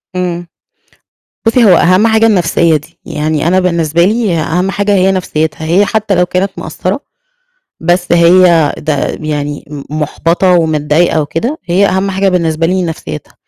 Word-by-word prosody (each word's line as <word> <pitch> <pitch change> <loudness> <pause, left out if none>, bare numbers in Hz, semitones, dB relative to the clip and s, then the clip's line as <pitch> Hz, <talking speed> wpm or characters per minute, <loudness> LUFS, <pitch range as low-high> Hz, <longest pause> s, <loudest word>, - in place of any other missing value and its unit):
إمم. 175 -1 -3 1.0
بُصّي 230 +2 +3
هو - - +5
أهَم 185 +6 +3
حاجة 220 0 +3
النَفْسية 170 -6 +2
دي، 150 - -16
يعني 155 +1 -2
أنا 185 +2 +3
بالنسبة 170 -2 +1
لي 215 -4 0
ه 160 - -1
أهَم 180 +5 -1
حاجة 205 +1 -1
هي 190 0 +3
نَفْسيتها 160 -4 -2
هي 180 +6 +2
حتى 215 -2 -1
لو 180 0 +2
كانت 185 +2 -1
مقصّرة - - -3 0.8
بس 175 +1 0
هي 170 -2 +4
ده 150 -2 -2
م 155 - -8
يعني 145 -1 -4
م 145 -2 -7 0.2
مُحبَطة 165 +5 0
ومتضايقة 160 0 +1
وكده، 165 - -3
هي 185 +3 +2
أهَم 190 +1 -1
حاجة 195 +1 +1
بالنسبة 165 -3 0
لي 185 +1 0
نَفْسيتها. 160 - -6
175 Hz, 160 wpm, -12 LUFS, 160-190 Hz, 1.0 s, هو